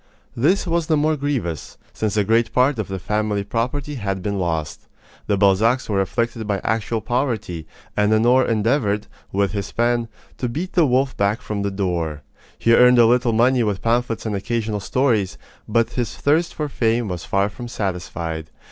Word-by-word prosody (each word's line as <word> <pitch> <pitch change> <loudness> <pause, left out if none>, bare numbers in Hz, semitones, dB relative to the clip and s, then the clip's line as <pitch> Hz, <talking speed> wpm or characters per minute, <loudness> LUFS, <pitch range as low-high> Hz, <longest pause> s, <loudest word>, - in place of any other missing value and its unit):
This 170 +13 +2
was 170 -2 0
the 155 - +3
more 155 +1 +2
grievous, 130 - -3 0.2
since 110 -1 -2
a 105 - +4
great 115 +3 +2
part 130 0 +2
of 110 - -2
the 95 - -4
family 105 +1 -1
property 125 +8 -2
had 95 -2 -2
been 100 0 -2
lost. 80 -4 -3 0.4
The 100 - +2
Balzacs 105 +6 +3
were 100 -2 +1
afflicted 115 +2 -2
by 100 -2 0
actual 110 +1 -1
poverty, 115 - -2 0.3
and 105 0 +2
Honore 120 +4 +4
endeavored, 110 -2 +1 0.3
with 100 0 +1
his 100 -2 -4
pen, 120 0 +1 0.3
to 125 - -1
beat 165 +10 -4
the 170 -5 +4
wolf 130 +1 +1
back 100 +3 +1
from 105 -1 -4
the 100 - 0
door. 85 -6 -2 0.3
He 115 - +3
earned 125 +1 +6
a 120 - +7
little 120 +1 +3
money 120 +3 +3
with 105 -4 -1
pamphlets 115 0 0
and 110 -2 -1
occasional 110 +1 -2
stories, 110 -2 0 0.3
but 115 0 +1
his 120 -2 -3
thirst 160 +4 +1
for 150 - -2
fame 115 -4 0
was 90 -3 -4
far 100 +1 +1
from 120 +4 -8
satisfied. 85 -6 -4
115 Hz, 180 wpm, -21 LUFS, 100-125 Hz, 0.4 s, a